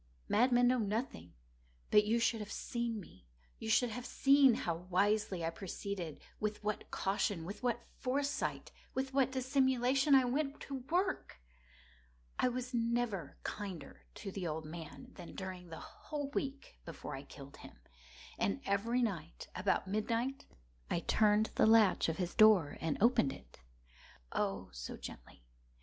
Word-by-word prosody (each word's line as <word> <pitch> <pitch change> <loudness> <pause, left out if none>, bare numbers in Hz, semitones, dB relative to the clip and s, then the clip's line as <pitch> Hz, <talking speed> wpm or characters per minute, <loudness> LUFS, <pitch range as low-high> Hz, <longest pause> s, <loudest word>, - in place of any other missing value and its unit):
Madmen 245 +2 +4
know 250 0 +3
nothing. 205 - -3 0.6
But 210 - +6
you 225 +2 +2
should 230 -1 +2
have 210 -1 -6
seen 235 -2 -2
me. 95 - -14 0.3
You 220 - -5
should 235 +1 +3
have 245 +3 -5
seen 275 -3 +5
how 170 - -1 0.2
wisely 195 -1 +2
I 165 - 0
proceeded—with 200 +3 -5
what 210 0 -3
caution—with 195 -1 -1
what 240 -1 0 0.2
foresight—with 270 0 -2
what 265 -1 +3
dissimulation 265 +1 +3
I 260 -1 +6
went 275 +3 -1
to 275 - -5
work! 370 - 0 1.0
I - - +4
was 250 +1 -3
never 230 - -1
kinder 190 -9 -6
to 195 - -6
the 185 -2 -3
old 155 0 -3
man 155 -3 -9
than - - -10
during 185 -2 -6
the 160 - -7
whole 290 -2 -6
week 275 0 -4
before 165 - -7
I 135 - -6
killed 140 0 -12
him. - - -13 0.6
And 95 -2 +1
every 230 +5 +1
night, 170 -7 -4
about 190 +1 +1
midnight, 230 +6 -1 0.4
I 170 - 0
turned 215 +2 +3
the - - +4
latch 220 -6 +5
of 160 - -2
his 180 -2 -2
door 210 -9 +6
and 160 -2 0
opened 220 - +4
it—oh, - - -7
so - - -6
gently! - - -10
215 Hz, 140 wpm, -35 LUFS, 170-250 Hz, 1.0 s, But